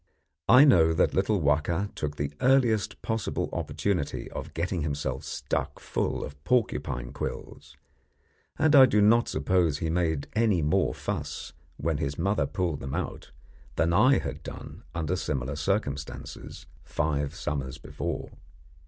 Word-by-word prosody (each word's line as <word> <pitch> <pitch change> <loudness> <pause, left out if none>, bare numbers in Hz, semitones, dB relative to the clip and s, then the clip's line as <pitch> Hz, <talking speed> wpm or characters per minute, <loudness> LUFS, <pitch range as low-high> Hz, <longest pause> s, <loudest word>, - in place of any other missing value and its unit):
I 130 +5 +9
know 80 - +5
that 85 - +2
little 100 +2 +2
Wahka 80 +6 +1
took 75 -1 -4
the 75 -1 -3
earliest 120 -5 +2
possible 110 -1 -2
opportunity 90 -8 -2
of 75 +4 -7
getting 85 +1 -1
himself 75 -1 -2
stuck - - -3
full - - -2
of 70 0 -12
porcupine 70 - 0
quills, 75 -1 -7 0.8
and 155 0 +4
I 135 -2 +9
do 105 - +2
not 115 +3 +5
suppose 80 0 +1
he 80 +1 -2
made 80 -4 0
any 110 -7 +2
more 75 - +1
fuss - - -4 0.2
when 80 -1 -1
his 70 -1 -2
mother 100 +5 +1
pulled 90 -6 -2
them 65 0 -4
out - - -4 0.5
than 85 +1 +2
I 125 +9 +5
had - - -4
done - - -9
under 85 +1 -1
similar 70 -6 -2
circumstances 75 -4 -3 0.2
five 75 0 -1
summers 70 -6 -3
before. 70 - -5
80 Hz, 140 wpm, -27 LUFS, 75-105 Hz, 0.8 s, I